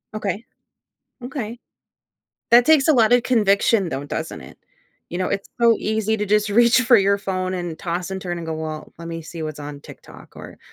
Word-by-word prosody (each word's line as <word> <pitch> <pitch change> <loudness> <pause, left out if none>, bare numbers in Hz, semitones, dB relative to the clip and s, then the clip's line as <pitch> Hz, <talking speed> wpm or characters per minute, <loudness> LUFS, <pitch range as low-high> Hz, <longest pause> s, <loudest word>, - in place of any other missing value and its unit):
Okay, 210 +1 -3 0.8
okay. 245 -3 -5 0.9
That 240 +1 +7
takes 310 -1 +4
a 310 - +6
lot 230 -2 +4
of 245 -1 +4
conviction 205 -4 +2
though, 140 -1 -4
doesn't - - -5
it? - - -14 0.5
You 175 - -5
know, 185 - -1
it's 195 - -3
so 230 -1 +6
easy 220 0 -1
to 210 - -2
just 210 +1 +1
reach 235 +4 +5
for 240 -1 +5
your 200 +1 +3
phone 185 -2 -3
and 175 -3 -4
toss 175 +1 -4
and 190 0 -5
turn 175 -2 -4
and 165 -1 -7
go, 160 - -2
"Well, 155 -1 -6
let 170 - -9
me 165 0 -5
see 165 0 -8
what's 155 -1 -6
on 145 -1 -8
TikTok," - - -14
or, - - -11
200 Hz, 200 wpm, -21 LUFS, 170-230 Hz, 0.9 s, That